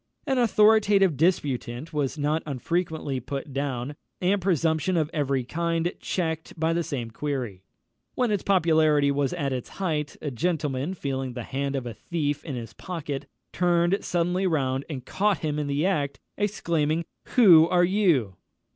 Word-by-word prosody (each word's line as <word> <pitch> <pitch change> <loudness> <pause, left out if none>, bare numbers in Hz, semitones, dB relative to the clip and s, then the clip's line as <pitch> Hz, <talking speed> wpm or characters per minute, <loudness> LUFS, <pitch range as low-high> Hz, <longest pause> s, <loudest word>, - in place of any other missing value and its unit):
An 265 -3 +1
authoritative 210 -5 +4
disputant 145 -3 0
was 145 -1 -1
not 150 +2 0
unfrequently 155 0 -2
put 135 +2 -6
down, 135 0 -3 0.2
and 190 +2 +1
presumption 170 -1 +1
of 155 -1 0
every 140 -4 0
kind 165 +5 -1
checked 160 -2 -3
by 160 +1 +2
the 170 - +1
same 125 -8 -4
query. 125 -8 -4 0.5
When 250 -3 +1
its 205 -3 +1
popularity 155 -6 +3
was 140 -1 0
at 140 -2 -1
its 125 -2 -4
height, 155 -6 -3
a 145 - -4
gentleman, 150 +2 -1
feeling 135 -5 -3
the 120 -1 -5
hand 140 +3 -3
of 130 -2 -3
a 120 - -5
thief 145 - -2
in 145 -5 -5
his 115 -2 -7
pocket, 150 -6 -5 0.3
turned 175 +2 +2
suddenly 180 +2 0
round 135 -5 0
and 130 -5 -6
caught 205 0 +1
him 150 -1 -1
in 150 - -2
the 145 +3 0
act, 145 -8 0 0.2
exclaiming, 170 -6 0 0.3
"_Who 175 -9 +7
are 175 -1 +4
you? 170 - +2
155 Hz, 155 wpm, -26 LUFS, 140-175 Hz, 0.5 s, Who